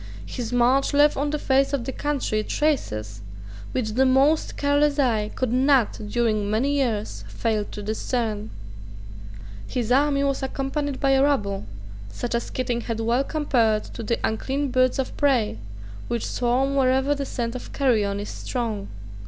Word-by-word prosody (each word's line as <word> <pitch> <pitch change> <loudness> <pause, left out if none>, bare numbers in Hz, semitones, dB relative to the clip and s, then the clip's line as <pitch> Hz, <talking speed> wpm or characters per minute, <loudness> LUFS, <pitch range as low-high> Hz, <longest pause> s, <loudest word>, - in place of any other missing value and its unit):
His 240 -2 -5
march 250 +4 +3
left 290 +1 +5
on 290 +2 -1
the 300 - -1
face 275 -1 +2
of 260 -4 -1
the 265 - -3
country 275 -7 -1
traces 110 - -1 0.5
which 220 -4 -1
the 255 +5 +3
most 275 +4 +3
careless 285 0 +2
eye 225 -7 +1
could 255 -2 -1
not 260 -2 +3 0.2
during 215 -3 0
many 230 +7 +1
years 215 - -1
fail 210 - -1
to 205 - -8
discern. 220 0 -2 1.2
His 240 -2 -2
army 280 +1 +3
was 275 -1 0
accompanied 270 +1 -3
by 275 -1 +2
a 270 0 +4
rabble, 205 - +1 0.4
such 235 - -4
as 235 0 -1
Keating 245 -2 -2
had 230 -1 -4
well 235 +4 +1
compared 240 -8 +1
to - - -6
the 230 +1 -1
unclean 270 +5 -1
birds 255 0 +2
of 265 - -3
prey 245 - +2 0.5
which 235 -1 -2
swarm 255 +3 0
wherever 265 +1 +3
the 280 -1 -3
scent 235 -4 -3
of 255 - -7
carrion 215 -7 +1
is 205 - -5
strong. 225 -5 -3
255 Hz, 160 wpm, -24 LUFS, 220-275 Hz, 1.2 s, left